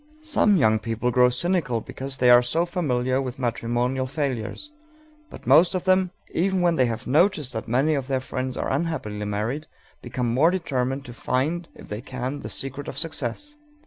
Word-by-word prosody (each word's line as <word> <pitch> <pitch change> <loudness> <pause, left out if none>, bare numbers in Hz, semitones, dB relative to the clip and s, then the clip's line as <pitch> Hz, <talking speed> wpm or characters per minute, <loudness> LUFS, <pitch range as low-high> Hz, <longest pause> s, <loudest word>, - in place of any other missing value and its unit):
Some 215 -10 +3
young 110 -7 +4
people 115 +2 -1
grow 125 +1 +5
cynical 140 -2 0
because 135 +4 -6
they 125 -1 +5
are 120 0 +8
so 160 +8 0
familiar 130 -7 0
with 130 -2 -5
matrimonial 125 +1 -1
failures; 140 - -3 0.6
but - - -12
most 175 +3 +5
of 180 - -1
them, 185 0 +3 0.2
even 190 +1 +1
when 175 -1 +3
they 130 -5 +3
have 115 +1 -4
noticed 150 -1 +2
that 110 - -4
many 135 +7 +2
of 135 -3 -2
their 135 -1 0
friends 130 0 -4
are - - -2
unhappily 135 -9 -2
married, 110 +9 -2 0.3
become 120 -1 -2
more 145 +7 +5
determined 135 -6 -1
to 120 - -9
find, 155 +9 -1
if - - -13
they 105 +2 -4
can, 130 +3 -4
the - - -7
secret 135 +1 -5
of - - -6
success. 155 - -4
130 Hz, 180 wpm, -24 LUFS, 125-165 Hz, 0.6 s, are